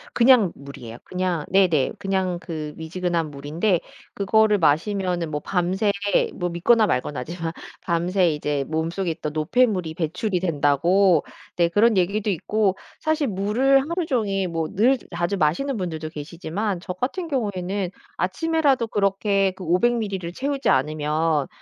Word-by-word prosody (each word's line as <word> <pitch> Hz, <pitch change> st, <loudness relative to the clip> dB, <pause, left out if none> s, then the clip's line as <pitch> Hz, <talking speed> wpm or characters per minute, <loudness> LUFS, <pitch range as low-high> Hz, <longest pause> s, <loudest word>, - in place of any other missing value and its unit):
그냥 235 Hz, -6 st, +5 dB
물이에요. 125 Hz, -5 st, -10 dB
그냥 180 Hz, -3 st, -2 dB
네네 175 Hz, -8 st, +3 dB
그냥 190 Hz, -2 st, -1 dB
그 155 Hz, -4 st, -6 dB
미지근한 165 Hz, -1 st, -2 dB
물인데 160 Hz, +7 st, 0 dB, 0.3 s
그거를 210 Hz, +1 st, +3 dB
마시면은 175 Hz, +1 st, +1 dB
뭐 150 Hz, -, -2 dB
밤새 190 Hz, +5 st, 0 dB, 0.4 s
뭐 175 Hz, -1 st, -2 dB
믿거나 215 Hz, +7 st, +3 dB
말거나지만 165 Hz, +2 st, -2 dB, 0.3 s
밤새 175 Hz, +1 st, +1 dB
이제 150 Hz, -2 st, -1 dB
몸속에 165 Hz, +4 st, -2 dB
있던 150 Hz, -1 st, -5 dB
노폐물이 180 Hz, +1 st, +1 dB
배출이 180 Hz, +4 st, -1 dB
된다고 170 Hz, +2 st, +3 dB, 0.3 s
네 170 Hz, -1 st, +3 dB
그런 210 Hz, +5 st, +3 dB
얘기도 200 Hz, +4 st, +1 dB
있고 200 Hz, +1 st, 0 dB, 0.3 s
사실 310 Hz, -2 st, +2 dB
물을 220 Hz, +7 st, +2 dB
하루 340 Hz, +5 st, -2 dB
종일 200 Hz, -, 0 dB
뭐 165 Hz, -1 st, -2 dB
늘 245 Hz, +7 st, +4 dB, 0.2 s
자주 175 Hz, +3 st, -1 dB
마시는 190 Hz, -, 0 dB
분들도 160 Hz, -5 st, -4 dB
계시지만 170 Hz, +6 st, -4 dB
저 180 Hz, +1 st, -5 dB
같은 275 Hz, -, -3 dB
경우에는 200 Hz, -, -2 dB, 0.3 s
아침에라도 275 Hz, -, +1 dB
그렇게 195 Hz, -1 st, +1 dB
그 185 Hz, 0 st, -11 dB
500 185 Hz, +9 st, +3 dB
미리를 195 Hz, -6 st, -3 dB
채우지 275 Hz, +7 st, -1 dB
않으면 150 Hz, +1 st, +1 dB
185 Hz, 315 characters per minute, -23 LUFS, 160-210 Hz, 0.4 s, 그냥